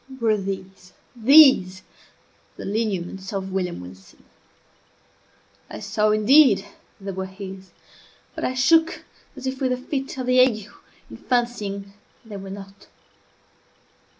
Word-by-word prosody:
Were 225 -2 +2
these, 190 -2 -7 0.2
these 240 -7 +6 0.7
the - - -8
lineaments 195 -3 -3
of 190 -1 -4
William 180 - -3
Wilson? 95 +1 -14 1.5
I - - -8
saw, 215 0 0
indeed, 215 0 +5 0.3
that 195 - -15
they 195 - -3
were 190 0 -5
his, 190 -1 -10 0.6
but - - -7
I 255 - -1
shook 320 +6 +2 0.3
as - - -9
if 260 0 -4
with 260 -1 +1
a - - -2
fit 270 +1 -5
of 255 - -3
the 255 0 +3
ague, 225 -5 +2 0.4
in - - -9
fancying 210 -5 -2 0.3
they 210 -2 -8
were 195 0 -9
not. 195 0 -11
205 Hz, 130 wpm, -23 LUFS, 190-250 Hz, 1.5 s, these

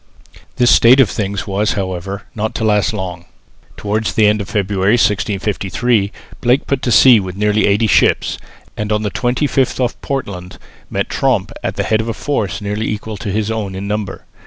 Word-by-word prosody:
This 120 -1 +4
state 125 +4 +6
of 125 -8 +4
things 100 -2 -3
was 100 +2 0
however 95 +1 -4
not 110 -2 -3
to - - -2
last 105 -2 +2
long. 90 -5 -5 0.5
Towards 105 +2 -1
the 110 - +3
end 105 0 +3
of 100 - -7
February, 100 -2 +1
1653, 100 +1 0 0.3
Blake 125 +3 +2
put 140 -2 -1
to 120 - -1
sea 125 -1 +7
with 95 -2 -5
nearly 105 +1 +2
eighty 105 +3 +2
ships, 110 - +2 0.4
and 105 +3 -3
on 105 0 0
the 105 - -2
25th 130 +3 0
off 125 -1 -1
Portland 100 -10 -5 0.3
met - - -2
Tromp - - 0
at - - -2
the - - -1
head 110 0 +1
of 115 - -5
a 115 - -3
force 115 -7 -2
nearly 105 +2 -2
equal 105 0 -5
to 105 0 -5
his 105 +2 -1
own 105 -4 -3
in 95 +1 -5
number. 105 -1 -4
105 Hz, 185 wpm, -17 LUFS, 100-115 Hz, 0.5 s, sea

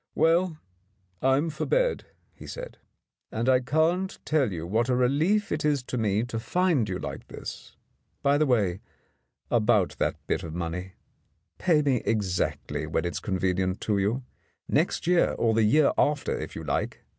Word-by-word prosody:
"Well, 170 0 +3 0.6
I'm 135 +5 +2
for 150 - -4
bed," - - +1 0.3
he - - -12
said. - - -8 0.5
"And 115 +3 -2
I 130 -1 +5
can't 160 +8 +1
tell 145 -8 +2
you 85 -2 -4
what 115 +7 0
a 125 - +3
relief 155 +12 +2
it 155 - -1
is 145 -3 +1
to 125 - -5
me 105 0 +1
to 120 -2 -4
find 165 - +1
you 90 - -2
like - - -7
this. - - -9 0.5
By 140 +1 +3
the 155 - +3
way, 100 -8 +2 0.7
about 110 -5 +3
that - - +1
bit - - -1
of 80 -1 -7
money. 90 +2 -4 0.7
Pay 160 -5 +3
me 135 -3 +2
exactly 100 -5 -1
when - - -1
it's 85 - -2
convenient 95 -1 -1
to 105 -2 0
you 110 +7 0 0.2
— - - -43
next 160 +5 +1
year 175 0 +3
or 115 -1 +2
the 115 - +3
year 140 +8 +4
after, 145 -1 +1
if - - -6
you - - -6
like. - - -2
125 Hz, 170 wpm, -27 LUFS, 100-155 Hz, 0.7 s, I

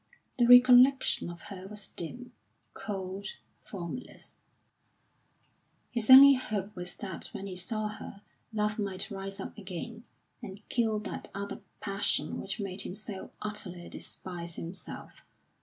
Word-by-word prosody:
The 240 - +5
recollection 250 -2 +7
of 170 -1 -9
her 185 0 -8
was 210 0 -6
dim, 245 +9 -7 0.4
cold, 195 -1 -5 0.4
formless; 190 +5 -7 1.6
his 235 -2 -1
only 275 +2 +12
hope 210 -5 -3
was 180 -1 -4
that 190 -4 -4
when 195 - -5
he 190 -2 -5
saw 215 +4 -2
her 210 -1 -9 0.3
love 210 0 0
might 195 -2 -2
rise 195 0 -6
up - - -6
again, 210 +5 -6 0.4
and 205 -2 -9
kill 225 -3 +2
that - - -6
other 200 0 -5 0.2
passion 200 0 0
which - - -4
made 195 -1 -2
him 180 - -6
so 210 -2 -7
utterly 205 -5 -5
despise 170 -2 -7
himself. 170 +3 -8
200 Hz, 130 wpm, -30 LUFS, 185-220 Hz, 1.6 s, only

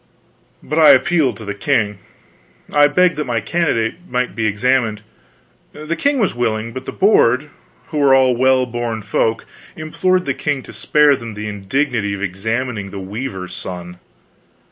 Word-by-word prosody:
But 150 +3 -1
I 155 - +8
appealed 135 -4 +2
to 110 - -10
the 100 - -3
king. 105 -2 0 0.7
I 145 0 +6
begged 180 +3 +2
that 150 -3 -3
my 120 -2 0
candidate 150 - -1
might 125 0 -2
be 110 -1 0
examined. 110 0 0 0.7
The 155 +2 -4
king 280 - +1
was 215 -7 +1
willing, 115 -1 -2
but 130 0 -7
the - - -3
Board, 150 - +3 0.4
who 150 - -3
were 140 -2 +5
all 130 -2 +4
well 130 +1 +3
born 120 -2 -4
folk, 110 +2 -1 0.3
implored 180 +4 0
the - - 0
king 145 -5 -2
to - - -12
spare 150 -1 +3
them 115 -4 -8
the 105 +1 -5
indignity 105 +1 -1
of 100 - -8
examining 105 +3 -3
the 100 - -8
weaver's 95 -2 -6
son. 90 -1 -7
125 Hz, 165 wpm, -18 LUFS, 105-145 Hz, 0.7 s, I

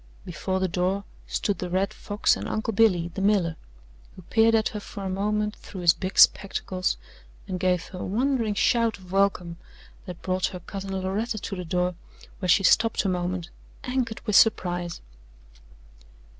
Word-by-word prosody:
Before 185 +2 -2
the 185 - +1
door 185 +3 -1 0.2
stood 205 - -1
the 180 - -4
Red 190 +2 0
Fox 205 0 +1
and - - -5
Uncle 220 +1 -2
Billy, 185 -6 +3
the 195 - -4
miller, 195 -5 +2 0.6
who 185 - -12
peered 225 +4 +3
at 220 -1 +2
her 210 - -5
for 200 0 -8
a 190 - -2
moment 210 +2 -1
through 190 - -9
his 170 -1 +6
big 185 0 -5
spectacles 185 - +3 0.5
and 185 -1 -3
gave 180 -1 +1
her 185 - -8
a - - -4
wondering 230 0 0
shout 230 0 +2
of 185 -2 -15
welcome 190 -3 +1 0.5
that 180 -2 -8
brought 185 0 0
her 180 - -7
cousin 195 +1 -5
Loretta 210 +5 -2
to 195 - -5
the 180 - -5
door, 180 +2 0 0.5
where 185 -3 -3
she 195 +4 +5
stopped 220 +2 +3
a - - +2
moment, 180 -1 -2 0.3
anchored 250 -3 -2
with 210 -3 0
surprise. 175 -5 +3
190 Hz, 170 wpm, -26 LUFS, 180-210 Hz, 0.6 s, his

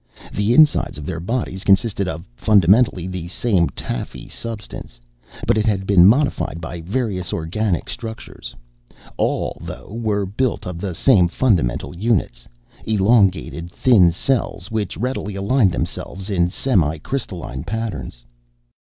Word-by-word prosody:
The 105 +4 +1
insides 155 - +4
of 75 - -7
their 85 0 -4
bodies 95 0 -3
consisted 100 0 +2
of 85 -2 -5
fundamentally 100 - +4
the 90 -2 -5
same 95 -2 +1
taffy - - -6
substance; 105 - -7 0.5
but 110 - +3
it 110 - 0
had 95 -3 0
been 95 -2 +6
modified 125 - +2
by 85 +1 -6
various 95 -1 -2
organic 90 +4 -1
structures. 110 - -8 0.6
All, - - -1
though, - - -9
were 110 -3 -1
built 110 +3 -1
of 90 -2 -5
the 95 -2 -4
same 95 -5 +4
fundamental 85 - 0
units: 90 - -1 0.4
elongated, 100 -5 +2
thin 100 -3 +5
cells 100 0 -2
which 110 -2 -2
readily 115 -4 -3
aligned 100 +1 +2
themselves 95 +3 -5
in 90 -2 +2
semi 90 - +1
crystalline 85 - -5
patterns. 100 - -5
100 Hz, 130 wpm, -20 LUFS, 85-110 Hz, 0.6 s, been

